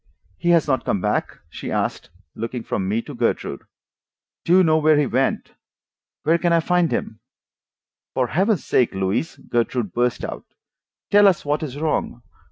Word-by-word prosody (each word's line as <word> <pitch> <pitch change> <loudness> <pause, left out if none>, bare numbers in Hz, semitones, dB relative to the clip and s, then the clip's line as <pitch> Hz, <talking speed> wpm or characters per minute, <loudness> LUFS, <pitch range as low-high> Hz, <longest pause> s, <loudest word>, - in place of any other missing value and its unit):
"He 175 - 0
has 170 -2 +4
not 130 -4 +1
come 100 - 0
back?" - - -2
she - - -7
asked, - - -2 0.2
looking 115 +1 -5
from 95 -3 -2
me 110 +3 0
to - - -9
Gertrude. - - -1 0.8
"Do 175 +2 +4
you 190 - +6
know 160 -2 +3
where 155 0 +4
he 145 - +3
went? 130 +2 -1 0.7
Where 165 +2 +3
can 175 0 +1
I 170 - +4
find 175 0 +1
him?" 110 - -3 1.0
"For 130 - +2
Heaven's 190 - 0
sake, 120 -6 +2
Louise," 95 +11 -1
Gertrude 120 -3 -2
burst 120 0 0
out, - - -9 0.6
"tell 205 0 +7
us 185 -6 +2
what 145 +1 0
is 145 -3 -5
wrong. 150 -5 -2
145 Hz, 170 wpm, -22 LUFS, 120-170 Hz, 1.0 s, tell